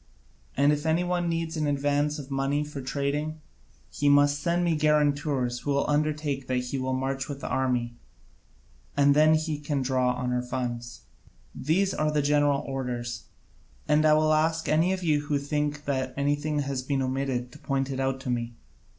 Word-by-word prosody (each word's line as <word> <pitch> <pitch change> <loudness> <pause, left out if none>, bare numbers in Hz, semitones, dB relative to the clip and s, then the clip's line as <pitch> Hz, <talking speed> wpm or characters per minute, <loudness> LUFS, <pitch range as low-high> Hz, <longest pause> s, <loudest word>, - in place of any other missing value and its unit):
And 140 +2 +4
if 150 +2 -2
any 165 +3 +2
one 175 -1 0
needs 165 -1 -2
an 155 -2 0
advance 145 +1 +1
of 140 -2 -9
money 135 +2 0
for 150 -2 -7
trading, 145 +4 -2 0.5
he 145 - +1
must 145 0 +4
send 170 +2 +1
me 170 -2 +2
guarantors 145 -4 +1
who - - -6
will 140 0 +1
undertake 150 -2 -1
that 130 - 0
he 125 +2 -2
will 130 0 -1
march 135 +1 -2
with 140 -1 -5
the - - -4
army, 125 -3 0 1.0
and 140 0 +5
then 155 +1 +6
he 155 -1 -2
can 145 -2 -2
draw 130 -1 +1
on 125 0 -2
our 125 - +1
funds. 120 -2 -4 0.5
These 185 +7 +1
are 155 0 0
the 150 -1 +1
general 145 -1 +3
orders: 125 -4 -4 0.6
and 150 +1 +4
I 155 -1 +5
will 155 0 +3
ask 160 +1 +1
any 160 +4 +3
of 190 -1 -2
you 150 -3 +1
who 145 - +1
think 150 +1 -2
that 130 -2 -2
anything 145 +2 0
has 140 -2 -2
been 135 +1 -1
omitted 130 -2 -2
to - - -14
point 135 -1 -1
it 130 - -3
out 135 0 0
to 130 -2 -3
me. 120 -1 -3
145 Hz, 185 wpm, -27 LUFS, 130-150 Hz, 1.0 s, then